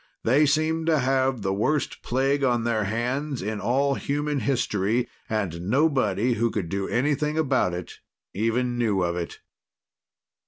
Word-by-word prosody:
They 140 +6 +4
seemed 160 +2 +1
to 160 -2 +4
have 130 -3 +1
the 95 0 0
worst 145 +9 -1
plague 135 +3 0
on 120 -3 +2
their 110 -3 0
hands 125 +5 -2
in 105 +1 -3
all 140 +3 +2
human 145 +1 -1
history; 120 -3 0 0.2
and 95 -5 -2
nobody 125 -5 +2
who 115 +1 +1
could 100 -7 -3
do 95 +1 -2
anything 150 +4 0
about 130 - +1
it 90 -1 -8 0.3
even 120 +4 0
knew 105 -6 +1
of 85 0 -1
it. 85 -1 -5
125 Hz, 150 wpm, -25 LUFS, 105-140 Hz, 0.3 s, They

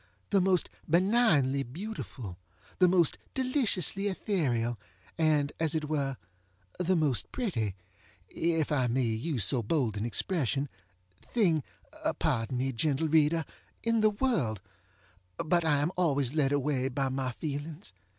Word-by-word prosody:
the 195 - +4
most 185 -1 +2 0.2
benignly 170 - +3
beautiful, 135 - -6 0.4
the 180 - +6
most 175 -3 +3 0.2
deliciously 235 - +1
ethereal, 140 - 0 0.4
and, 150 -3 +2
as 160 0 +1
it 155 -1 -1
were, 140 -4 -1 0.6
the 180 +1 +2
most 150 -7 +1
pretty 115 - -2 0.5
(if 165 -2 0
I 130 -4 +2
may 130 +2 +1
use 115 - 0
so 125 0 +3
bold 115 -2 0
an 100 - -2
expression) 140 - 0 0.5
thing 175 -10 +1 0.6
(pardon 115 +3 0
me, 135 +2 0
gentle 145 +5 0
reader!) 160 +1 +3 0.4
in 230 0 +2
the 215 0 +4
worldŌĆöbut 110 - -3
I 155 -3 +3
am 145 +4 0
always 145 -7 +1
led 145 -3 +2
away 140 -2 +1
by 135 +1 -1
my 130 -1 -2
feelings. 150 - -6
150 Hz, 130 wpm, -30 LUFS, 130-175 Hz, 0.6 s, the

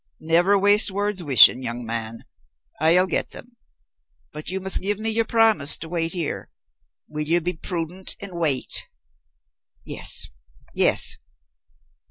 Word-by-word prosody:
"Never 175 +5 +1
waste 205 +2 +3
words 200 0 -4
wishing, 135 -4 +6
young 120 -1 -6
man. 115 0 -7 0.5
I'll 165 +4 +3
get 185 - -3
them. 245 0 -11 0.8
But 150 - -7
you 190 +1 -3
must 190 0 +2
give 205 +1 -2
me 220 +1 -3
your 225 +1 -1
promise 220 -11 +2
to 165 - -9
wait 165 -1 -4
here. 170 -5 -5 0.6
Will 150 0 -6
you 170 +2 +2
be 175 +2 -4
prudent 175 +2 -5
and 200 -1 -10
wait?" 160 -7 0 1.0
"Yes, - - +1 0.4
yes." - - +4
175 Hz, 135 wpm, -21 LUFS, 150-200 Hz, 1.0 s, wishing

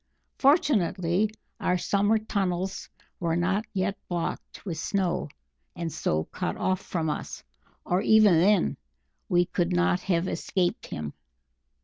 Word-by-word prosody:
Fortunately, 210 - +3 0.3
our 180 - +1
summer 205 +4 +2
tunnels 195 -3 -2 0.3
were 165 -2 0
not 190 +5 +1
yet 195 0 -1
blocked 175 +3 -4
with 165 -5 -4
snow 180 -2 -1 0.5
and 170 -2 -4
so 80 0 0
cut 85 - -4
off 185 0 0
from 165 -3 -2
us, 150 - -4 0.4
or 180 +2 +1
even 210 -6 +6
then 195 +1 +3 0.5
we 175 0 +4
could 175 0 -1
not 180 0 +3
have 180 -1 0
escaped 180 -2 -1
him." 75 -3 -5
180 Hz, 125 wpm, -27 LUFS, 170-200 Hz, 0.5 s, even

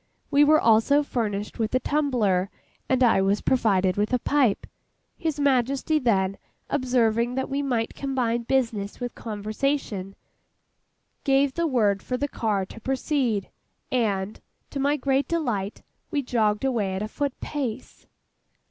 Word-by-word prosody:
We 285 +1 +6
were 310 +1 +6
also 230 +6 +4
furnished 210 -7 -3
with 225 +2 0
a - - +4
tumbler, 240 -12 +1 0.4
and 260 -1 +3
I 230 -5 +4
was 195 +2 +2
provided 195 -7 +2
with 210 +1 0
a - - +5
pipe. 255 -4 +1 0.5
His 320 -4 -3
Majesty, 275 +2 +2
then 195 -7 +1 0.3
observing 245 -3 +1
that 265 +1 -2
we 280 +1 0
might 245 -5 -1
combine 250 -4 -1
business 230 -5 -1
with 245 -1 -4
conversation, 215 -2 -3 1.1
gave 275 0 +3
the 335 +2 0
word 210 -8 +2
for 250 - -3
the 285 - -1
car 210 -7 -1
to 225 - -12
proceed; 260 -5 -1 0.4
and, 210 -5 -1 0.3
to 280 - -4
my 285 +2 +2
great 275 0 +1
delight, 235 -12 -2 0.3
we 290 -4 -1
jogged 220 -2 +1
away 215 -8 0
at 190 - -2
a - - -3
foot 280 +3 -3
pace. 260 -5 -5
245 Hz, 145 wpm, -25 LUFS, 210-275 Hz, 1.1 s, We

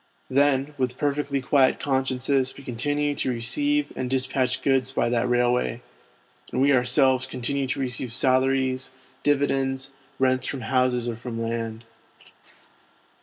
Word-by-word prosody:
Then 140 +1 +2
with 125 -1 -1
perfectly 145 -1 -1
quiet 135 -1 +3
consciences 130 -1 0
we 140 - -11
continue 145 +4 -1
to 135 - -2
receive 290 - 0
and 125 - -3
despatch 130 -1 0
goods 130 -1 +2
by 125 - 0
that 120 +1 0
railway, 125 0 +1 0.7
and - - -2
we 140 +2 +4
ourselves 130 +1 +3
continue 135 +2 -2
to 130 - -2
receive 125 -2 -2
salaries, 130 +1 +1 0.3
dividends, 135 -2 0 0.3
rents 130 -1 +1
from 135 - -4
houses 125 0 +1
or 120 - -2
from 115 0 -6
land, 115 0 -4 0.3
etc. - - -22
130 Hz, 135 wpm, -25 LUFS, 125-135 Hz, 0.7 s, we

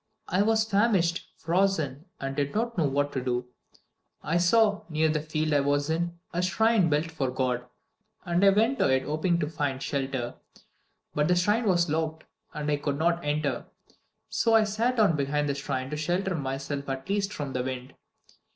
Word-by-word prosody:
I 185 - +2
was 220 +1 +3
famished, 195 -5 +1
frozen, 165 -5 0
and 135 0 -4
did 140 +2 -1
not 235 +2 -1
know 165 - +2
what 145 +1 0
to 130 - -3
do. 125 -1 -1 0.8
I 165 - +1
saw, 205 +4 +3
near 155 0 +2
the 155 -1 0
field 155 0 -1
I 145 - +4
was 145 +2 +1
in, 170 +1 -1 0.2
a 175 - 0
shrine 205 0 +3
built 155 +2 0
for 140 -5 -1
God, 125 -1 -1 0.6
and 175 +1 +1
I 200 - +8
went 225 +7 +2
to - - +4
it 130 0 +2
hoping 155 +4 0
to 150 - 0
find 145 -4 -2
shelter. 135 -3 -2 0.8
But 150 0 +1
the 180 - +3
shrine 210 +6 +2
was 175 -2 +3
locked, 160 0 -2 0.3
and 150 0 -3
I 145 - +2
could 145 -1 -2
not 170 +2 +1
enter. 145 -3 -1 0.6
So 225 +1 +2
I 220 - +6
sat 225 +4 0
down 205 -7 +4
behind 145 +1 0
the 140 - 0
shrine 135 -1 -3
to 150 - -2
shelter 175 +5 0
myself 140 -1 -4
at 135 +3 -4
least 200 0 0
from 145 -9 -5
the 125 - 0
wind. 130 0 -5
155 Hz, 190 wpm, -27 LUFS, 140-190 Hz, 0.8 s, I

